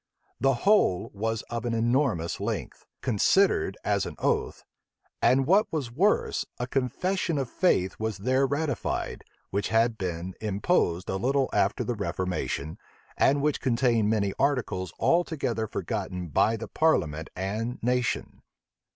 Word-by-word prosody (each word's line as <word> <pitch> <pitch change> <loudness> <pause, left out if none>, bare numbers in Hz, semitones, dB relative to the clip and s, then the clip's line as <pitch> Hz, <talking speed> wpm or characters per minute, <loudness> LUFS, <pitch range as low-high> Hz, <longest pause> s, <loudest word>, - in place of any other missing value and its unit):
The 135 -1 +3
whole 200 - +3
was 110 +2 -2
of 120 0 -5
an 120 -1 -1
enormous 115 - +1
length, - - -4
considered 125 - +2
as 100 -2 +1
an - - -7
oath; - - -1 0.6
and 130 +3 +4
what 195 +8 +3
was 140 -7 -3
worse, 190 - +1
a 125 - -2
confession 150 +7 -1
of 135 -3 -2
faith 95 - +1
was 110 -2 -2
there 130 +6 +2
ratified, 145 -2 -2 0.3
which 100 +1 0
had 115 0 +2
been 90 0 -3
imposed 100 - +1
a 95 - -1
little 135 +5 +1
after - - +1
the 120 - -1
reformation, 90 -7 -3 0.4
and 140 +1 +3
which 150 -1 +1
contained 115 -4 +2
many 100 -3 +1
articles 125 -10 0
altogether 145 -10 +1
forgotten 90 -2 -4
by 110 +10 +2
the 115 - -6
parliament 80 - +1
and 110 +6 -3
nation. 125 0 -1
115 Hz, 135 wpm, -27 LUFS, 100-135 Hz, 0.6 s, and